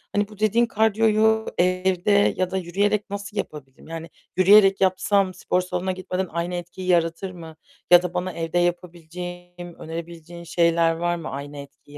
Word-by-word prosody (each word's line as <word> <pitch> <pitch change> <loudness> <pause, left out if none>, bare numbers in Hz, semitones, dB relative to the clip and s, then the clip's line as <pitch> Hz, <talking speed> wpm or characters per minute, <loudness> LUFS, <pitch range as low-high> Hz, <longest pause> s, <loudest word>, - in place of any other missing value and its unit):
Hani, 205 0 +1
bu 210 -1 -16
dediğin 220 +3 +3
kardiyoyu 220 0 +2
evde 185 +2 +2
ya 185 0 -1
da 190 - -1
yürüyerek 200 +4 -1
nasıl 200 +1 -6
yapabilirim? 145 -8 -7
Yani, 165 0 -7 0.3
yürüyerek 195 +1 +6
yapsam 190 +1 +2
spor 180 0 -1
salonuna 180 +1 -3
gitmeden 185 0 -3
aynı 170 +2 -3
etkiyi 175 +1 -7
yaratır 170 +1 +1
mı? 165 -3 -11 0.4
Ya 175 0 +9
da 180 - -4
bana 180 +1 -3
evde 165 +1 -3
yapabileceğim, 175 0 -5
önerebileceğin 170 +1 -8
şeyler 170 -1 +2
var 175 +1 -1
mı 165 -2 -6
aynı 145 +1 -7
etkiyi 145 +1 -12
180 Hz, 155 wpm, -23 LUFS, 170-195 Hz, 0.4 s, Ya